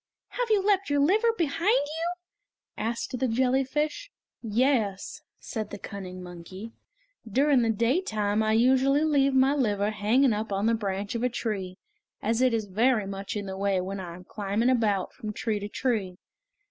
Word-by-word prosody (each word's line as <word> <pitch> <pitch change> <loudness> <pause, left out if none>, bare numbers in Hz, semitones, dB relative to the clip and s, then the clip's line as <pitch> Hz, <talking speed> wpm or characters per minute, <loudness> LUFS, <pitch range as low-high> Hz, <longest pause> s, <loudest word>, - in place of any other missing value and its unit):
"Have - - -2
you 410 -3 +3
left 395 -3 +2
your 285 0 +2
liver 420 +11 +4
behind 335 +4 0
you?" 325 +4 -2 0.6
asked 235 +3 -3
the 260 - +1
jellyfish. 265 - 0 0.3
"Yes," 225 -3 0 0.2
said 220 -3 -5
the 205 - -7
cunning 185 -3 -8
monkey, 180 +5 -9 0.6
"during 275 +3 +4
the 230 - +1
daytime 220 - +1
I 215 0 +2
usually 265 +5 +4
leave 275 -3 +3
my 265 +1 +4
liver 210 -7 +1
hanging 225 +5 +3
up 215 0 -3
on 195 +1 0
the 230 - +3
branch 200 -2 -2
of 235 - -2
a 250 - +2
tree, 195 -6 -4 0.4
as 225 +3 0
it 255 -1 +4
is 225 -2 -1
very 220 +3 +2
much 195 +1 -5
in 205 -1 -3
the 190 -1 -5
way 195 -1 +1
when 190 +2 -4
I 175 -2 -7
am 180 - -12
climbing 210 +6 0
about 210 -6 +1
from 215 -1 -6
tree 215 -1 -2
to 205 +1 -6
tree. 210 -8 -1
225 Hz, 170 wpm, -27 LUFS, 200-270 Hz, 0.6 s, liver